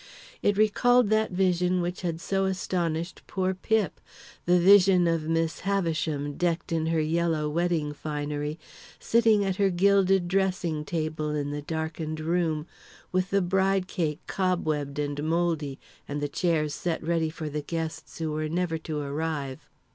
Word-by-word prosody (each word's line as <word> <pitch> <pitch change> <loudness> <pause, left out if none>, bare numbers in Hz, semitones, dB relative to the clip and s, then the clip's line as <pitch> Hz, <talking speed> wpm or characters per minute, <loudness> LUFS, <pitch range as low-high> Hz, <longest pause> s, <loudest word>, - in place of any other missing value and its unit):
It 205 -1 +2
recalled 220 +2 +4
that 215 0 +3
vision 180 -1 +1
which 175 +1 -3
had 170 -3 -2
so 195 +2 0
astonished 175 -2 -2
poor 190 -1 0
Pip 215 +2 0 0.4
the 180 +1 +4
vision 185 -1 +6
of 165 -2 0
Miss 165 0 0
Havisham, 160 -7 -1
decked 170 0 -1
in 160 -1 0
her 165 0 +1
yellow 160 0 +1
wedding 160 -1 0
finery, 150 0 -3 0.4
sitting 225 -3 +3
at 190 -1 -1
her 200 -1 +3
gilded 190 0 +3
dressing 185 -4 0
table 155 -2 -2
in 145 -1 -2
the 145 0 -4
darkened 160 0 -4
room, 160 -1 0 0.5
with 185 0 0
the 195 -1 +2
bride 190 +1 +1
cake 160 -5 -2
cobwebbed 155 -7 -1
and 145 0 -2
mouldy, 160 -4 0 0.3
and 145 +1 -3
the 145 - -1
chairs 155 -1 0
set 170 0 -2
ready 165 -1 +1
for 155 0 -6
the 150 0 -3
guests 160 +1 -5
who 160 -2 -2
were 155 0 -2
never 170 -1 -1
to 155 -1 -5
arrive. 145 -2 -4
165 Hz, 155 wpm, -27 LUFS, 155-185 Hz, 0.5 s, vision